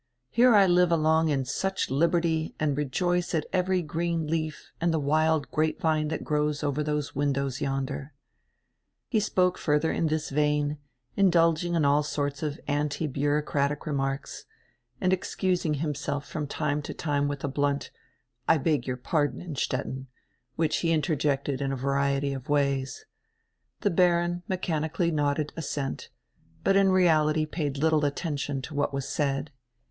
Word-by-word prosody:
Here 240 0 +5
I 200 -1 +7
live 180 -1 +4
along 160 0 +3
in 135 -3 0
such 190 +5 -2
liberty 165 +2 +1
and 150 -2 +1
rejoice 175 +5 0
at 155 - 0
every 185 -1 +1
green 165 +1 -1
leaf 155 0 -3
and 170 0 +2
the 160 - +1
wild 155 +1 +1
grape 155 0 0
vine 155 -1 +1
that 155 - -3
grows 150 0 0
over 145 0 0
those 150 -1 -2
windows 140 -1 -1
yonder." 135 +1 -3 1.0
He 225 - +2
spoke 180 -3 +1
further 150 +1 +1
in 165 - 0
this 155 -1 -2
vein, 150 0 +1 0.4
indulging 175 -2 +3
in 160 -3 +2
all 145 +1 +4
sorts 145 -1 -2
of 150 -2 -3
anti 145 +1 -1
bureaucratic 145 0 0
remarks, 135 -2 -3 0.5
and 185 0 +2
excusing 180 -3 0
himself 145 -1 -3
from 150 -3 -4
time 150 0 -1
to - - -7
time 145 -2 0
with 145 -1 -4
a - - 0
blunt 140 0 -1 0.6
"I - - +5
beg 145 -3 0
your 125 -1 -2
pardon, 145 +3 0
Innstetten," 135 -4 -3 0.5
which 155 -1 +1
he 165 - 0
interjected 145 -3 0
in 135 -1 -1
a - - -1
variety 140 +1 0
of 135 +2 -7
ways. 140 - 0 0.8
The 205 - +2
Baron 175 0 +2
mechan 165 -4 -1
ically 170 +1 0
nodded 145 0 0
assent, 145 -3 -4 0.5
but 195 - +3
in 195 -1 +5
reality 155 -4 +3
paid 150 -3 -3
little 155 +1 +2
attention 145 -2 -2
to 150 - -7
what 145 -1 -1
was 135 -1 -3
said. 140 0 -1
150 Hz, 155 wpm, -27 LUFS, 140-165 Hz, 1.0 s, I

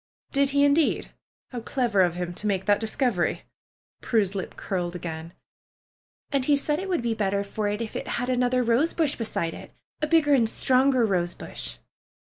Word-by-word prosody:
"Did 280 -1 +2
he, 280 +1 +3
indeed? 290 +2 +2 0.4
How 245 - -4
clever 230 -3 +1
of 175 -2 +2
him 175 -1 -3
to 210 - -3
make 195 -2 0
that 205 0 +3
discovery!'^ 220 -3 0 0.6
Prue's 205 -5 +1
lip 195 -2 -5
curled 180 -2 -3
again. 165 -1 -6 1.0
"And 275 -2 +1
he 290 0 +4
said 295 +2 0
that 380 - -4
it - - -6
would 350 -10 0
be 235 -1 +1
better 200 -2 0
for 205 +1 -3
it 205 +2 -2
if 225 - -5
it - - -4
had 245 +1 -2
another 250 0 +2
rosebush 285 +5 +2
beside 170 -7 -2
it, - - -11 0.3
a 305 - +1
bigger 300 -2 +4
and 235 -5 +4
stronger 255 0 +3
rose 175 -4 0
bush." 60 - -6
230 Hz, 185 wpm, -26 LUFS, 190-275 Hz, 1.0 s, he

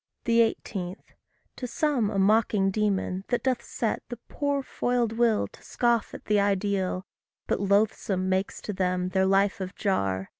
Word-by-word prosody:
18. 225 -5 +1 0.6
To 250 - -4
some 250 -4 +1
a 205 - -3
mocking 205 -1 +3
demon, 195 -2 0
that 245 - -1
doth 255 -2 +1
set 225 - -2
The 240 - -5
poor 285 -2 -1
foiled 245 -3 0
will 230 -2 +2
to - - -18
scoff 235 -2 0
at - - -11
the 210 -1 +3
ideal, 195 -2 0 0.4
But - - 0
loathsome 200 -1 +1
makes 190 +1 -1
to 210 - -3
them 180 -1 0
their 190 0 +2
life 195 +1 +2
of 185 +1 -5
jar. 95 - -1
205 Hz, 155 wpm, -27 LUFS, 190-230 Hz, 0.6 s, mocking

